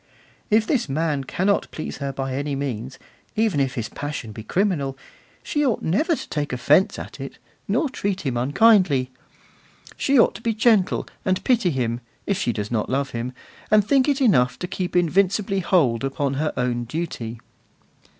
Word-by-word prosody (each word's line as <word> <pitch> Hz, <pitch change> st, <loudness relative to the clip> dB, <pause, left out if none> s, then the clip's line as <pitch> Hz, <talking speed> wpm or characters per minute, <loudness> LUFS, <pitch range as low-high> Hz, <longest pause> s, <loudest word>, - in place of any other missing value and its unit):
If 215 Hz, +1 st, +4 dB
this 240 Hz, -, 0 dB
man 150 Hz, -1 st, -1 dB
cannot 195 Hz, +8 st, 0 dB
please 155 Hz, -, -6 dB
her 140 Hz, -1 st, -3 dB
by 135 Hz, -1 st, -4 dB
any 140 Hz, +1 st, -2 dB
means, 130 Hz, -2 st, -4 dB, 0.4 s
even 215 Hz, -8 st, +1 dB
if 135 Hz, 0 st, 0 dB
his 115 Hz, -4 st, -2 dB
passion 145 Hz, -6 st, -5 dB
be 110 Hz, -, -8 dB
criminal, 145 Hz, -, 0 dB, 0.5 s
she 295 Hz, -, 0 dB
ought 250 Hz, -6 st, 0 dB
never 305 Hz, -, +2 dB
to -, -, -8 dB
take 150 Hz, -1 st, -2 dB
offence 145 Hz, -, +3 dB
at -, -, -8 dB
it, -, -, -7 dB, 0.3 s
nor 315 Hz, -, +1 dB
treat 200 Hz, -7 st, -2 dB
him 135 Hz, -6 st, -2 dB
unkindly; 145 Hz, -, +4 dB, 0.8 s
she 275 Hz, 0 st, +2 dB
ought -, -, +5 dB
to -, -, -10 dB
be 230 Hz, -2 st, -1 dB
gentle, 220 Hz, -4 st, +3 dB, 0.2 s
and 185 Hz, -1 st, 0 dB
pity 235 Hz, -8 st, +3 dB
him, 120 Hz, -5 st, -1 dB, 0.2 s
if 200 Hz, -, 0 dB
she 120 Hz, -, +1 dB
does 105 Hz, -1 st, -4 dB
not 110 Hz, -3 st, -1 dB
love 135 Hz, +1 st, -1 dB
him, 120 Hz, +1 st, -3 dB, 0.4 s
and 215 Hz, -2 st, +5 dB
think 270 Hz, +3 st, +3 dB
it 280 Hz, -1 st, +1 dB
enough 125 Hz, -, +3 dB
to 180 Hz, -, -4 dB
keep 180 Hz, 0 st, -4 dB
invincibly 195 Hz, +3 st, +2 dB
hold 150 Hz, -, +2 dB
upon 135 Hz, 0 st, -1 dB
her 155 Hz, -, 0 dB
own 120 Hz, -1 st, -1 dB
duty. 120 Hz, -5 st, -4 dB
150 Hz, 175 wpm, -23 LUFS, 130-200 Hz, 0.8 s, ought